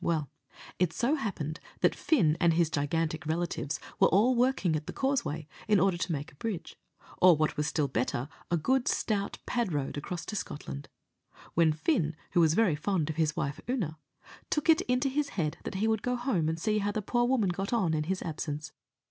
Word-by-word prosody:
Well, 155 -4 0 0.5
it 180 -2 +3
so 245 +5 +1
happened 180 - -3 0.2
that - - +4
Fin 175 - +2
and 170 -2 +4
his 165 -2 +2
gigantic 160 +2 -1
relatives 160 -2 -2 0.2
were - - +7
all 215 +8 +4
working 240 -9 +2
at 155 0 -4
the - - -5
Causeway, 235 - -1 0.2
in 210 -2 +5
order 190 0 +3
to 175 - -2
make 145 -2 -3
a - - -21
bridge, 185 -6 -4 0.5
or 180 -2 +8
what 155 0 +1
was 150 0 0
still 150 -1 +1
better, 125 0 -1 0.2
a 170 - +2
good 260 - +1
stout 200 -2 0
pad 240 -6 0
road, 145 -2 -2
across 170 +3 -5
to 215 - -5
Scotland; 70 - -5 0.6
when 165 -1 +4
Fin, 160 - 0 0.2
who - - +3
was 160 -1 +4
very 210 -8 +3
fond 160 -1 0
of 155 - -9
his 160 0 +1
wife 140 -5 -2
Oonagh, 185 - -1 0.5
took 300 +2 0
it 325 +2 +6
into 250 +2 +2
his 285 +2 0
head 160 -2 0
that - - -4
he 210 +4 +1
would 220 -2 +1
go 250 0 0
home 240 - 0
and 160 +1 -2
see 215 +3 +1
how 205 0 0
the 210 0 -3
poor 240 +4 +1
woman 240 -6 +2
got 195 +3 -2
on 195 -9 +2
in 150 -1 0
his 190 +3 -2
absence. 150 -2 -4
175 Hz, 205 wpm, -30 LUFS, 155-225 Hz, 0.6 s, or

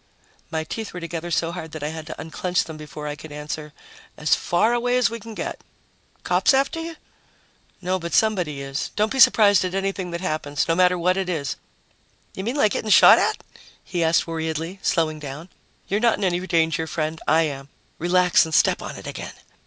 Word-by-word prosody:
My 160 0 -2
teeth 215 +5 -6
were - - -4
together 170 0 -5
so 165 0 0
hard 160 -3 -7
that 155 -2 -6
I 150 - -1
had 160 0 -7
to - - -7
unclench 180 +3 -1
them 160 - -9
before 150 0 -9
I 145 - -4
could 155 0 -11
answer, 150 +1 -6 0.5
"As 150 0 +1
far 210 +7 +2
away 245 +1 +1
as 250 -2 +2
we 230 - -5
can 225 0 -10
get." - - -5 0.6
"Cops 270 - +3
after 275 +5 +1
you?" 330 0 -6 0.9
"No, 185 +1 0
but 170 -1 -3
somebody 180 -10 +1
is. 135 +1 -4
Don't 215 +1 +1
be 270 - -2
surprised 205 -5 +6
at 185 0 -3
anything 195 -1 -2
that 170 0 -4
happens, 155 -5 -2
no 165 - +2
matter 180 +1 +3
what 180 +2 +1
it 190 -1 -2
is." 150 -6 -2 0.8
"You 190 - -6
mean 235 +6 -2
like 215 -8 +3
getting 220 - -2
shot - - +8
at?" - - 0 0.4
he 175 -2 -2
asked 160 0 +3
worriedly, 165 +2 -4
slowing 155 -4 0
down. 150 +4 -8 0.4
"You're 205 - 0
not 235 0 +3
in 205 - -4
any 175 -2 +1
danger, 160 -2 +1
friend. 155 0 -3
I 160 +1 +4
am. 140 -2 -5 0.3
Relax 180 +1 +4
and 160 -1 -2
step - - +3
on - - -6
it - - -10
again." - - -6
170 Hz, 205 wpm, -23 LUFS, 155-195 Hz, 0.9 s, shot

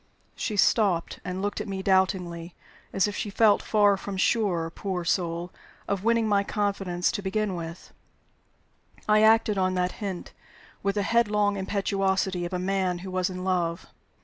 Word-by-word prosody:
She 215 -4 -3
stopped, 195 -5 +2
and 185 +1 -4
looked 205 - -2
at - - -6
me 190 -1 -4
doubtingly, 180 -3 0 0.4
as 195 +1 +2
if 205 - -4
she 210 - -3
felt 210 0 +4
far 205 -2 +3
from 195 0 -6
sure, 185 -6 +1
poor 180 -1 -4
soul, 170 0 -1 0.4
of 200 -1 -2
winning 230 0 +2
my 200 -1 +3
confidence 195 -4 -1
to - - -3
begin 200 +1 -1
with. 170 0 -8 1.1
I 215 0 +5
acted 220 -2 +4
on 185 0 +1
that 180 0 0
hint, 195 -4 -5 0.5
with 200 0 0
the 205 - +1
headlong 210 -2 +2
impetuosity 190 -2 0
of 175 - -6
a - - 0
man 185 -1 0
who 190 - -6
was 185 +1 0
in 185 0 -6
love. 175 -2 -1
195 Hz, 165 wpm, -26 LUFS, 180-205 Hz, 1.1 s, I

